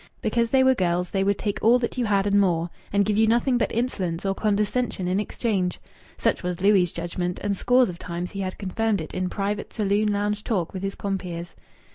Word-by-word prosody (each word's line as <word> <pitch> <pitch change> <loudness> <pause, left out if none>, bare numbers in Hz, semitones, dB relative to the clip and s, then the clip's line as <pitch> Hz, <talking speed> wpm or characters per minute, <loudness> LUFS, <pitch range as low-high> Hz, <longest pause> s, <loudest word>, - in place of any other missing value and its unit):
Because 235 -1 +1
they 260 +2 +4
were 260 0 +5
girls 180 -4 0
they 195 -1 +1
would 200 0 +1
take 205 -1 -2
all 235 +3 +6
that 240 -1 -3
you 250 -2 0
had 200 -2 +2
and 200 0 +3
more, 175 -3 +1 0.2
and 200 0 +3
give 210 0 0
you 220 0 +4
nothing 240 +2 +2
but - - 0
insolence 195 -8 -2
or 195 - +1
condescension 210 0 0
in 185 +2 +1
exchange. 205 -4 -1 0.4
Such - - +1
was 180 -1 -3
Louis' 190 -3 +4
judgment, 175 +1 -3
and 205 -1 0
scores 250 +5 +4
of 175 -2 -7
times 175 +1 -5
he 195 - -6
had 185 -1 -3
confirmed 210 +2 -1
it 160 - -7
in 185 0 -1
private 205 +1 -3
saloon 210 0 +1
lounge 205 +1 -1
talk 185 -7 -1
with 190 - -5
his 195 0 -3
compeers. 180 -4 -4
200 Hz, 215 wpm, -25 LUFS, 180-215 Hz, 0.4 s, all